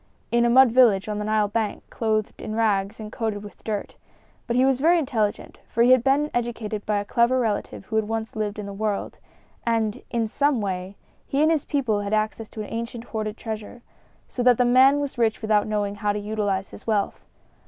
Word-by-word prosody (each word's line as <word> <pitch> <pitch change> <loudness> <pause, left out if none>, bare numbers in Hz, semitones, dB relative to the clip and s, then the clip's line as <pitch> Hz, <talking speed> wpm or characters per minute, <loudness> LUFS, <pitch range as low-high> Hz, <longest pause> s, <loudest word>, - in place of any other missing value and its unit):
"In 235 0 +3
a - - +3
mud 255 0 +6
village 225 -6 +4
on 210 -1 -3
the 210 - -3
Nile 215 -1 +2
bank, 215 0 -2
clothed 215 -2 -1
in 215 - -5
rags 210 -2 0
and 215 -1 -7
coated 220 -3 -3
with 205 - -12
dirt. 210 -2 -4 0.5
But 235 - -1
he 255 +1 +4
was 265 -1 +2
very 335 +5 +4
intelligent, 235 -9 -2
for 235 - +2
he 245 - +5
had 255 -2 +6
been 280 +3 +2
educated 225 -3 -3
by 210 -1 +1
a 205 - -2
clever 235 +4 +2
relative 215 -4 -2
who 220 - -2
had 215 -1 +1
once 225 0 -3
lived 210 -1 -2
in 210 - -5
the 200 - -6
world; 210 0 -3 0.4
and, 225 -2 0
in 230 -2 0
some 285 +3 +1
way, 190 -1 -3 0.3
he 275 - -1
and 315 - +4
his 315 -4 0
people 250 -8 0
had 200 +1 -3
access 215 +1 -2
to 220 - -7
an 210 - -7
ancient 230 0 -4
hoarded 215 -2 -4
treasure, 220 +1 -7 0.4
so 250 - -4
that 245 -1 +5
the 250 - +3
man 260 +3 +5
was 280 -3 -4
rich 225 -2 +2
without 215 -1 +1
knowing 205 -1 -1
how 205 0 -1
to 210 - -2
utilize 205 -2 -2
his - - -13
wealth. 210 -3 -1
220 Hz, 215 wpm, -24 LUFS, 210-240 Hz, 0.5 s, mud